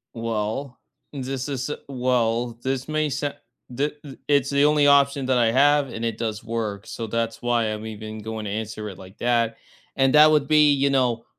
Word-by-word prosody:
Well, 115 Hz, +3 st, -3 dB, 0.3 s
this 135 Hz, 0 st, -4 dB
is 135 Hz, 0 st, -3 dB
eh 150 Hz, -, -2 dB
Well, 120 Hz, -2 st, 0 dB
this 130 Hz, +1 st, -2 dB
may 155 Hz, -1 st, 0 dB
sound 145 Hz, +1 st, -3 dB, 0.4 s
Thi 145 Hz, +4 st, 0 dB
i 135 Hz, -, -9 dB
it's 140 Hz, -2 st, +3 dB
the 140 Hz, 0 st, +2 dB
only 150 Hz, -1 st, +4 dB
option 140 Hz, -1 st, +4 dB
that 130 Hz, -1 st, +2 dB
I 115 Hz, -2 st, +3 dB
have 145 Hz, +2 st, +3 dB
and 115 Hz, 0 st, -5 dB
it 115 Hz, -1 st, -2 dB
does 110 Hz, -2 st, -4 dB
work. 110 Hz, -3 st, -4 dB
So, 115 Hz, -, -5 dB
that's 115 Hz, +1 st, -2 dB
why 120 Hz, -2 st, +1 dB
I'm 110 Hz, 0 st, -4 dB
even 110 Hz, 0 st, -7 dB
going 110 Hz, 0 st, -6 dB
to 100 Hz, -, -4 dB
answer 110 Hz, 0 st, -4 dB
it 95 Hz, -, -10 dB
like 95 Hz, +1 st, -13 dB
that, 115 Hz, -1 st, +1 dB, 0.4 s
and 135 Hz, -1 st, +3 dB
that 150 Hz, +1 st, +8 dB
would 150 Hz, -2 st, +2 dB
be, 150 Hz, -1 st, +5 dB
you 140 Hz, 0 st, +2 dB
know, 125 Hz, -4 st, +1 dB
125 Hz, 200 wpm, -23 LUFS, 110-140 Hz, 0.4 s, that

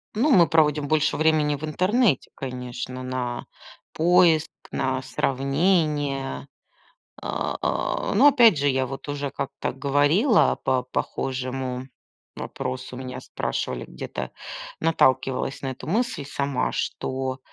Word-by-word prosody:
Ну, 255 Hz, +8 st, +2 dB
мы 175 Hz, -8 st, +7 dB
проводим 150 Hz, -2 st, +3 dB
больше 150 Hz, -1 st, +2 dB
времени 155 Hz, -1 st, +3 dB
в 145 Hz, -, -10 dB
интернете, 185 Hz, -, +2 dB
конечно, 125 Hz, 0 st, -5 dB
на 125 Hz, -1 st, -3 dB, 0.5 s
поиск, 165 Hz, -1 st, +4 dB, 0.2 s
на 130 Hz, 0 st, -1 dB
сравнение. 140 Hz, 0 st, 0 dB, 0.7 s
А, -, -, -2 dB
а. -, -, -1 dB
Но 290 Hz, -, +7 dB
опять 235 Hz, -, +6 dB
же, 145 Hz, 0 st, +1 dB
я 130 Hz, -1 st, +2 dB
вот 135 Hz, +3 st, -7 dB
уже 145 Hz, -1 st, -3 dB
как-то 140 Hz, -1 st, -4 dB
говорила 145 Hz, -, +3 dB
по 130 Hz, -1 st, +1 dB
похожему 130 Hz, 0 st, -3 dB, 0.5 s
вопросу. 130 Hz, -1 st, -5 dB
Меня 130 Hz, 0 st, -6 dB
спрашивали -, -, -3 dB
где-то, -, -, -6 dB, 0.5 s
наталкивалась 135 Hz, -2 st, +1 dB
на 135 Hz, -, -2 dB
эту 130 Hz, -, -9 dB
мысль 225 Hz, -, 0 dB
сама, 140 Hz, -2 st, -1 dB
что 130 Hz, 0 st, -3 dB
140 Hz, 115 wpm, -24 LUFS, 130-155 Hz, 0.7 s, мы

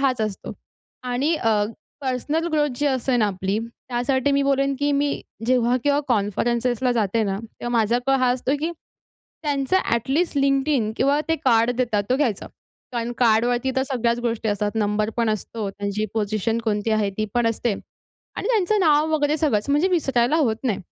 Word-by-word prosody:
हाच 260 Hz, -4 st, +1 dB
असतो. 215 Hz, -3 st, -3 dB, 0.5 s
आणि 255 Hz, +6 st, 0 dB
अ, 220 Hz, -6 st, +2 dB, 0.4 s
पर्सनल 285 Hz, +5 st, -1 dB
ग्रोथ 300 Hz, -1 st, +2 dB
जी 290 Hz, -, 0 dB
असे 260 Hz, -2 st, +1 dB
ना 220 Hz, -3 st, +3 dB
आपली, 195 Hz, +1 st, -2 dB
त्यासाठी 250 Hz, +3 st, -1 dB
मी 280 Hz, 0 st, +2 dB
बोलेन 275 Hz, 0 st, +1 dB
की 290 Hz, 0 st, +1 dB
मी 280 Hz, 0 st, 0 dB, 0.3 s
जेव्हा 250 Hz, -1 st, +3 dB
केव्हा 290 Hz, 0 st, +3 dB
कॉन्फरन्सेसला 240 Hz, +3 st, +1 dB
जाते 225 Hz, -1 st, +1 dB
ना, 195 Hz, 0 st, -2 dB
तेव्हा 230 Hz, +1 st, -8 dB
माझा 225 Hz, +2 st, +2 dB
कल 270 Hz, -, +3 dB
हां 250 Hz, -1 st, +3 dB
असतो, 255 Hz, +1 st, -2 dB
की 325 Hz, +2 st, -1 dB, 0.7 s
त्यांचं 285 Hz, +3 st, +1 dB
ॲटलिस्ट 270 Hz, +8 st, 0 dB
LinkedIn 275 Hz, -4 st, +2 dB
किंवा 280 Hz, +2 st, +2 dB
ते 325 Hz, -, +3 dB
कार्ड 230 Hz, -1 st, +4 dB
देतात, 230 Hz, -5 st, 0 dB
तो 255 Hz, -, +3 dB
घ्यायचा 240 Hz, -9 st, -1 dB, 0.4 s
कारण 240 Hz, -1 st, -2 dB
कार्डवरती 240 Hz, +2 st, +2 dB
तर 265 Hz, -, +2 dB
सगळ्याच 240 Hz, -3 st, 0 dB
गोष्टी 230 Hz, -2 st, -1 dB
असतात. 205 Hz, 0 st, -1 dB
नंबर 210 Hz, 0 st, 0 dB
पण 230 Hz, -1 st, +2 dB
असतो, 215 Hz, 0 st, -3 dB
त्यांची 205 Hz, +1 st, -3 dB
पोझिशन 215 Hz, +1 st, -1 dB
कोणती 215 Hz, 0 st, 0 dB
आहे 215 Hz, -2 st, +1 dB
ती 215 Hz, -, 0 dB
पण 240 Hz, -1 st, +2 dB
असते 230 Hz, 0 st, 0 dB, 0.6 s
आणि -, -, -3 dB
त्यांचं 430 Hz, -3 st, +2 dB
नाव 310 Hz, -3 st, +3 dB
वगैरे 295 Hz, 0 st, +1 dB
सगळंच, 280 Hz, -7 st, 0 dB
म्हणजे 295 Hz, +6 st, +3 dB
विसरायला 270 Hz, -7 st, +1 dB
होत 245 Hz, -9 st, +2 dB
नाही. 225 Hz, -6 st, 0 dB
245 Hz, 170 wpm, -23 LUFS, 220-280 Hz, 0.7 s, कार्ड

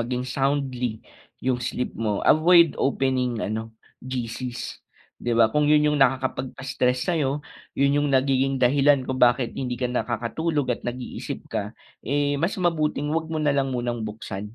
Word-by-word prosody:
maging 125 Hz, +2 st, -2 dB
soundly 130 Hz, -3 st, -1 dB, 0.4 s
'yung 125 Hz, -1 st, +1 dB
sleep 125 Hz, +1 st, -3 dB
mo, 105 Hz, -3 st, -2 dB
avoid 170 Hz, 0 st, +6 dB
opening 130 Hz, -4 st, 0 dB
ano, 110 Hz, +1 st, -4 dB, 0.3 s
GC's 125 Hz, -1 st, -5 dB, 0.4 s
'di 120 Hz, -1 st, -1 dB
ba 115 Hz, -1 st, +5 dB
kung 150 Hz, 0 st, +2 dB
'yun 150 Hz, 0 st, +4 dB
'yung 150 Hz, -, 0 dB
nakakapagpa-stress 130 Hz, +1 st, 0 dB
sayo, 145 Hz, -2 st, 0 dB, 0.3 s
'yun 140 Hz, +1 st, +3 dB
'yung 145 Hz, -, +1 dB
nagiging 135 Hz, 0 st, +2 dB
dahilan 140 Hz, +1 st, +4 dB
kung 130 Hz, 0 st, -3 dB
bakit 120 Hz, 0 st, +3 dB
hindi 125 Hz, -2 st, -3 dB
ka 125 Hz, 0 st, -2 dB
nakakatulog 130 Hz, +4 st, -1 dB
at -, -, -6 dB
nag-iisip 125 Hz, +1 st, -5 dB
ka, -, -, -3 dB, 0.3 s
eh, 145 Hz, +1 st, +1 dB
mas 170 Hz, +5 st, 0 dB
mabuting 155 Hz, -4 st, 0 dB
huwag 160 Hz, 0 st, -1 dB
mo 160 Hz, -, -3 dB
nalang 140 Hz, -3 st, +1 dB
munang 120 Hz, -1 st, -2 dB
buksan. 105 Hz, 0 st, -7 dB
130 Hz, 150 wpm, -24 LUFS, 120-145 Hz, 0.4 s, avoid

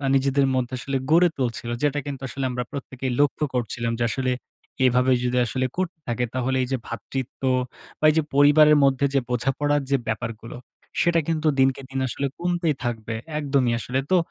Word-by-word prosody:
নিজেদের 135 Hz, 0 st, +2 dB
মধ্যে 130 Hz, 0 st, -1 dB
আসলে 135 Hz, +3 st, -2 dB
গড়ে 175 Hz, +2 st, +6 dB
তুলছিল। 120 Hz, -2 st, -2 dB
যেটা 145 Hz, 0 st, +2 dB
কিন্তু 140 Hz, -2 st, -5 dB
আসলে 135 Hz, +2 st, -5 dB
আমরা 125 Hz, 0 st, -2 dB
প্রত্যেকেই 135 Hz, -2 st, -4 dB
লক্ষ্য 145 Hz, +1 st, +2 dB
করছিলাম। 120 Hz, -1 st, -1 dB
যে -, -, +1 dB
আসলে 130 Hz, +2 st, -1 dB, 0.5 s
এভাবে 125 Hz, +1 st, +3 dB
যদি 125 Hz, 0 st, 0 dB
আসলে 130 Hz, +3 st, -1 dB
করতে 180 Hz, -3 st, -2 dB
থাকে 120 Hz, +1 st, -1 dB
তাহলে 130 Hz, +1 st, 0 dB
এই -, -, -3 dB
যে 130 Hz, -, +1 dB
ভ্রাতৃত্ব 130 Hz, +2 st, -6 dB, 0.6 s
বা -, -, +1 dB
এই -, -, +3 dB
যে 160 Hz, -, +3 dB
পরিবারের 150 Hz, +1 st, +6 dB
মধ্যে 135 Hz, 0 st, +3 dB
যে 140 Hz, -, +4 dB
বোঝাপড়ার 140 Hz, +4 st, +1 dB
যে 140 Hz, -, +4 dB
ব্যাপারগুলো, 115 Hz, +1 st, -4 dB, 0.4 s
সেটা 170 Hz, -1 st, +3 dB
কিন্তু 160 Hz, -1 st, 0 dB
দিনকে 135 Hz, +1 st, +3 dB
দিন 135 Hz, 0 st, -3 dB
আসলে 140 Hz, +3 st, -2 dB
কমতেই 175 Hz, -3 st, 0 dB
থাকবে। 115 Hz, -2 st, -3 dB, 0.3 s
একদমই 135 Hz, -5 st, +1 dB
আসলে। 130 Hz, +3 st, -2 dB
তো 185 Hz, -, +6 dB
135 Hz, 175 wpm, -24 LUFS, 125-145 Hz, 0.6 s, গড়ে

